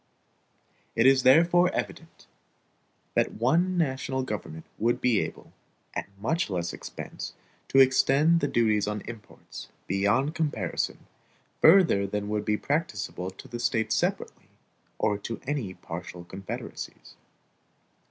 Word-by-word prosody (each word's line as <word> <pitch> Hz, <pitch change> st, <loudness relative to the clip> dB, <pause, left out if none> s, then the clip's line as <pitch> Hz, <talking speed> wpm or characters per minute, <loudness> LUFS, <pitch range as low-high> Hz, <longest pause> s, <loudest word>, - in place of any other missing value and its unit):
It 115 Hz, -, +3 dB
is 135 Hz, 0 st, +6 dB
therefore 170 Hz, +7 st, +5 dB
evident, 165 Hz, 0 st, -5 dB, 0.9 s
that -, -, +1 dB
one 170 Hz, +11 st, +2 dB
national 130 Hz, -4 st, -1 dB
government 95 Hz, -9 st, -6 dB
would 120 Hz, +2 st, +1 dB
be 120 Hz, -5 st, +3 dB
able, -, -, -6 dB, 0.4 s
at -, -, -4 dB
much 160 Hz, -, 0 dB
less 85 Hz, -2 st, -2 dB
expense, -, -, -7 dB, 0.3 s
to -, -, 0 dB
extend 135 Hz, +5 st, +5 dB
the 145 Hz, -, 0 dB
duties 110 Hz, -5 st, +2 dB
on 105 Hz, -1 st, -2 dB
imports, 115 Hz, -4 st, -10 dB, 0.2 s
beyond 100 Hz, -, +1 dB
comparison, 145 Hz, -, -2 dB, 0.6 s
further 160 Hz, -, +6 dB
than 105 Hz, +1 st, -3 dB
would 105 Hz, 0 st, -1 dB
be 105 Hz, 0 st, +1 dB
practicable 105 Hz, -, -2 dB
to 95 Hz, +8 st, -12 dB
the 120 Hz, -2 st, -6 dB
States 115 Hz, -2 st, +1 dB
separately, -, -, -2 dB, 0.5 s
or 105 Hz, -2 st, +1 dB
to 115 Hz, +3 st, -5 dB
any 125 Hz, -10 st, -3 dB
partial 90 Hz, 0 st, -8 dB
confederacies. 95 Hz, +2 st, -8 dB
120 Hz, 125 wpm, -27 LUFS, 100-145 Hz, 0.9 s, is